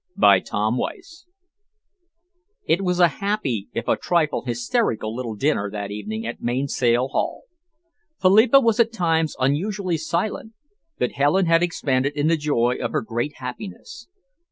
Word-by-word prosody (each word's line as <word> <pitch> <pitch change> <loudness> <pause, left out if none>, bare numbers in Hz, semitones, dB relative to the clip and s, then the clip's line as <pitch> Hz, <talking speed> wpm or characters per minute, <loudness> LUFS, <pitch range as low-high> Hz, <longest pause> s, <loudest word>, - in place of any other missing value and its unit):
CHAPTER 100 - +5
XXX 125 - -3 1.4
It 175 - +2
was 180 -1 0
a 175 - +7
happy, 150 - -2
if 115 - -4
a - - +3
trifle 165 -4 0
hysterical 120 - -1
little 120 -3 -4
dinner 105 -4 0
party - - -14
that 100 -1 -5
evening 105 +2 -5
at 120 - -6
Mainsail 125 0 0
Haul. - - -2 0.8
Philippa 220 +8 +6
was 230 -3 +2
at 230 -1 +4
times 165 -7 0
unusually 175 +7 0
silent, 175 +7 -3 0.4
but 125 - 0
Helen 150 +7 +2
had 165 0 +4
expanded 140 -5 0
in 145 0 0
the 165 +1 +3
joy 135 -6 0
of - - -3
her - - +1
great 120 +6 -3
happiness. 180 - -8
145 Hz, 145 wpm, -22 LUFS, 120-185 Hz, 1.4 s, a